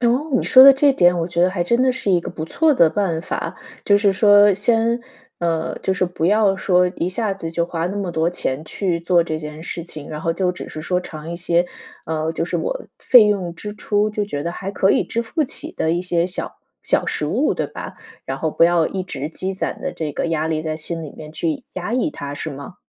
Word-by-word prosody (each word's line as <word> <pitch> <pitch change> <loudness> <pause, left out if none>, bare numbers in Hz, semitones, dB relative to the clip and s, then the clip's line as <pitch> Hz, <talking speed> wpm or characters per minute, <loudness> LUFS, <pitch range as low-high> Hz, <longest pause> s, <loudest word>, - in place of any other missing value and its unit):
哦， 250 +6 +1
你 - - +1
说 260 - +8
的 275 - +11
这 275 +1 +4
点， 175 -6 +4
我 165 - -1
觉 170 0 -1
得 180 - +5
还 185 -2 -1
真 235 +7 +2
的 260 0 +4
是 245 -6 -2
一 175 -2 +3
个 - - -6
不 155 - -5
错 310 - +2
的 165 -8 +5
办 175 -6 -1
法。 - - -4 0.3
就 205 - +5
是 200 -1 +3
说 205 0 +6
先 230 +4 +1 0.4
呃， 165 -2 -1
就 190 - 0
是 185 - +1
不 175 -2 -2
要 205 0 +3
说 180 -1 +3
一 170 - -1
下 210 +2 -1
子 180 -4 -6
就 170 0 0
花 170 0 -3
那 195 +3 -4
么 195 -3 -2
多 160 0 +1
钱 150 -4 -3
去 175 0 -2
做 170 0 +3
这 155 -2 -3
件 150 0 -8
事 170 0 -5
情， 155 -3 -8
然 155 0 -5
后 165 - 0
就 180 +1 0
只 - - -8
是 155 - -7
说 180 +2 0
尝 160 -2 -8
一 170 - -4
些 175 0 +2 0.4
呃， 160 0 -2
就 165 - -2
是 - - -2
我 - - -3
费 245 -4 +7
用 185 -5 -1
支 210 +4 -7
出， 210 0 0
就 210 -1 -2
觉 145 -8 -4
得 170 - -3
还 195 +2 -5
可 195 0 +2
以 - - +3
支 235 - -2
付 305 +8 -1
起 - - -5
的 160 - -1
一 175 +1 -1
些 175 -1 0
小 180 - -4 0.3
小 - - +1
食 - - -2
物， - - +1
对 - - -2
吧？ - - -8 0.3
然 135 - -3
后 160 +2 -1
不 165 - +4
要 170 -2 +3
一 190 -1 -3
直 150 -5 -5
积 190 +3 -3
攒 - - -4
的 - - -3
这 155 -3 -4
个 - - -2
压 160 -1 -1
力， 155 -1 -1
在 155 -1 -3
心 165 +1 -1
里 150 - -8
面 155 0 -11
去 285 - -3
压 185 +5 -4
抑 255 +5 0
它， 145 - -6
是 155 - -5
吗？ 140 +5 -9
180 Hz, 270 characters per minute, -20 LUFS, 165-205 Hz, 0.4 s, 的